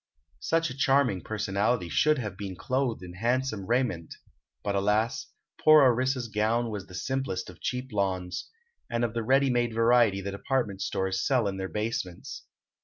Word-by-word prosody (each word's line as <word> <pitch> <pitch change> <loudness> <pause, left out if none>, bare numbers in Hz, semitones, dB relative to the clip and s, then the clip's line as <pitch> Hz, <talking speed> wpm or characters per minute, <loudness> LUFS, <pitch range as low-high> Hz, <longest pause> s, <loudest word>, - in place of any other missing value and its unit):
Such 165 - 0
a - - -7
charming 135 -8 +2
personality 105 0 -1
should 150 - +3
have 105 -7 -4
been 95 -1 -6
clothed 130 -2 -1
in 90 -1 -9
handsome 115 0 -1
raiment; 115 -10 -1 0.5
but, 100 - -1
alas, 105 +8 +1 0.4
poor 155 -1 +8
Orissa's 130 0 +2
gown 110 +2 0
was 100 -2 -5
the 90 - -11
simplest 110 -4 -3
of 90 - -19
cheap 125 +1 -3
lawns, 95 - -2 0.4
and 120 0 0
of 110 - -4
the 115 - -1
ready 135 +3 +3
made 120 -2 0
variety 115 -3 +4
the 100 +1 -4
department 100 -1 -2
stores 95 0 -1
sell 125 -6 +2
in 95 -1 -3
their 95 0 -4
basements. 105 -5 -4
115 Hz, 165 wpm, -28 LUFS, 95-130 Hz, 0.5 s, poor